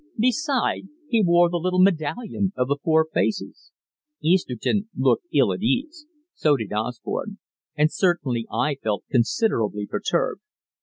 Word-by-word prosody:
Beside, 255 -2 0 0.2
he 230 -2 +3
wore 175 -1 +5
the 175 0 -1
little 185 +2 0
medallion 195 +3 +1
of 125 0 +1
the 140 +1 0
Four 160 -1 +3
Faces. 215 - -2 0.5
Easterton 185 - 0
looked 130 +4 +2
ill 135 -10 +3
at 90 - -6
ease; 300 - -1 0.3
so 150 -2 +2
did 110 -4 -5
Osborne; 120 - -3 0.4
and 150 +1 +2
certainly 135 - 0
I 145 -2 0
felt 105 -2 -2
considerably 115 - +1
perturbed. - - -1
160 Hz, 135 wpm, -23 LUFS, 125-205 Hz, 0.5 s, wore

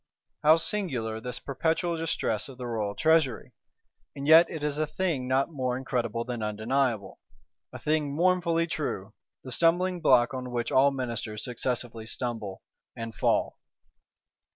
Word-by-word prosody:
How 155 +2 +6
singular 130 - -2
this 125 +1 -3
perpetual 165 +5 -1
distress 150 -9 -1
of 130 - -11
the 125 - -6
royal 110 -4 -2
treasury! 160 -5 +2 0.6
And 140 0 -5
yet 165 +2 +8
it 155 -2 -6
is 150 0 -1
a 155 - +1
thing 155 -6 -1
not 135 +4 +1
more 130 -4 -1
incredible 120 -3 -2
than 120 -2 -4
undeniable. 110 +1 -1 0.5
A - - -7
thing 150 -2 0
mournfully 170 -1 +2
true: 110 - -4 0.3
the 130 - -8
stumbling 175 +4 +2
block 125 -2 +4
on 130 -1 -4
which 120 -1 -2
all 135 +2 +5
Ministers 115 -5 -4
successively 120 -2 -3
stumble, 110 -5 -5 0.3
and 115 -1 -6
fall. - - 0
130 Hz, 145 wpm, -28 LUFS, 115-160 Hz, 0.6 s, yet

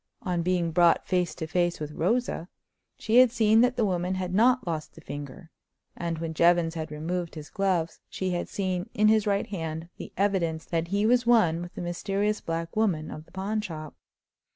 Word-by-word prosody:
On 180 -4 -1
being 175 -1 0
brought 170 0 +4
face 180 -2 0
to 160 - -4
face 175 +2 0
with 150 -1 -5
Rosa, 185 +2 -1 0.5
she 225 +2 +1
had 255 0 +8
seen 225 -2 +4
that 250 +1 +3
the 230 - +1
woman 180 -1 -1
had 185 -1 -3
not 245 +4 +4
lost 160 -3 -4
the - - -12
finger; 145 +4 -8 0.4
and 170 -2 -3
when 165 0 -4
Jevons 170 0 +3
had 160 -1 -4
removed 170 +3 -3
his 155 -1 -9
gloves 180 -4 0
she 185 -1 -2
had 175 -1 -2
seen 185 0 -2
in 215 0 +4
his 215 -1 +3
right 200 -1 +1
hand 165 -3 -5
the - - -8
evidence 175 -5 0
that 165 0 -1
he 200 +3 0
was 245 +1 +3
one 175 -9 +4
with 175 +1 -8
the - - -5
mysterious 195 +4 -1
black 165 0 -4
woman 190 -8 0
of 155 +1 -8
the - - -23
pawn 205 +3 -2
shop. 155 -7 -7
180 Hz, 200 wpm, -27 LUFS, 165-205 Hz, 0.5 s, had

